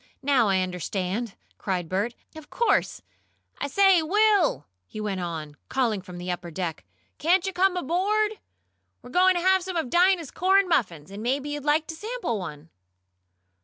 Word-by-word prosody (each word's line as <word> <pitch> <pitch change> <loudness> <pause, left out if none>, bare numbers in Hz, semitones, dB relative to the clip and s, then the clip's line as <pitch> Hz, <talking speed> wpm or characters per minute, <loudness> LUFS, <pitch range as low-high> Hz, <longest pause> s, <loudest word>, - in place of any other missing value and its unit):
Now 265 -5 +3
I 190 -1 +2
understand!" 185 +4 -3 0.2
cried 180 -4 -2
Bert. 205 +7 -2 0.2
"Of 315 -1 -11
course. 470 - 0 0.6
I - - -2
say, 385 +3 +5
Will!" 400 - +2 0.2
he - - -8
went 200 -3 -3
on, 155 -4 -5
calling 235 -6 0
down 190 - -15
from 180 -2 -9
the 180 +1 -4
upper 175 -1 -5
deck, 170 -1 -4 0.4
"can't 350 +5 +3
you 385 - -2
come 365 +1 +2
aboard? 410 +6 0 0.6
We're 245 - -11
going 370 +4 +4
to 350 - 0
have 375 +1 +4
some 370 -1 -4
of 315 -7 -2
Dinah's 350 -3 +3
corn 385 +2 +3
muffins, 185 - -1
and 200 +2 -7
maybe 270 +5 -1
you'd 290 -1 -5
like 300 +1 +2
to 320 - -7
sample 425 - -3
one." 155 -3 -8
280 Hz, 170 wpm, -25 LUFS, -, 0.6 s, say